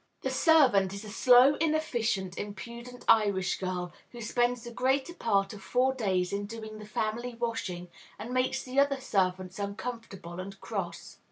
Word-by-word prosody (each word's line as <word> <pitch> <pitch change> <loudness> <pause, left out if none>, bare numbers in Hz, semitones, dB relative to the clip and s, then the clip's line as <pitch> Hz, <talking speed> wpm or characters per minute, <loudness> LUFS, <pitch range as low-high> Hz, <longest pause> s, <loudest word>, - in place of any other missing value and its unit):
The - - -1
servant 255 - +4
is 200 +2 -7
a 210 - -8
slow, 250 +4 +7
inefficient, 235 - 0
impudent 235 +5 -8
Irish 200 -4 +3
girl, 180 -2 -3 0.2
who 240 - -10
spends 240 +1 0
the 240 - -7
greater 265 +6 0
part 200 - +1
of 205 - -10
four 250 +7 +2
days 190 -7 0
in 200 0 -2
doing 220 -1 -8
the 210 - -10
family 225 +3 -2
washing, 215 -7 -3 0.3
and 235 +4 -6
makes 255 0 +1
the 260 +2 0
other 280 -1 +3
servants 185 -5 -1
uncomfortable 200 -4 -6
and 195 +1 -7
cross. 185 -6 -5
220 Hz, 160 wpm, -29 LUFS, 195-245 Hz, 0.3 s, slow